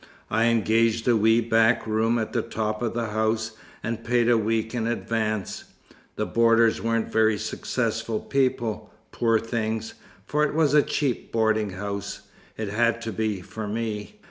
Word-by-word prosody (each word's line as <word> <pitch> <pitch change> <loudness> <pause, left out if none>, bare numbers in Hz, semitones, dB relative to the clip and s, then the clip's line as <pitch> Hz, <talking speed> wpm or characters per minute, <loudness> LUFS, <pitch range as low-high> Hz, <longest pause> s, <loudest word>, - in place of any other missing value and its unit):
I 115 - +3
engaged 115 0 +2
a 120 - +5
wee 110 +2 +4
back 115 0 +3
room 110 +2 +1
at 110 -2 -3
the - - +1
top 110 -1 -3
of 115 -1 -2
the 115 -2 -1
house, 110 +1 0 0.3
and 115 0 -3
paid 120 0 +2
a - - +5
week 110 +1 0
in 115 -2 -1
advance. 110 -3 -2 0.5
The - - -1
boarders 115 -1 +3
weren't 115 0 -1
very 110 -1 +3
successful 110 +2 -2
people, 120 -5 -1 0.2
poor 115 -1 +2
things, 110 -1 -3 0.3
for 150 +1 +1
it 150 - 0
was 155 -3 +3
a 150 - +7
cheap 140 -4 -2
boarding 110 -2 +1
house 100 +1 -5 0.4
it 110 -2 -3
had 115 +2 +1
to 115 - -3
be, 105 -2 -2
for 105 +3 -6
me. 110 - -4
115 Hz, 165 wpm, -25 LUFS, 110-115 Hz, 0.5 s, a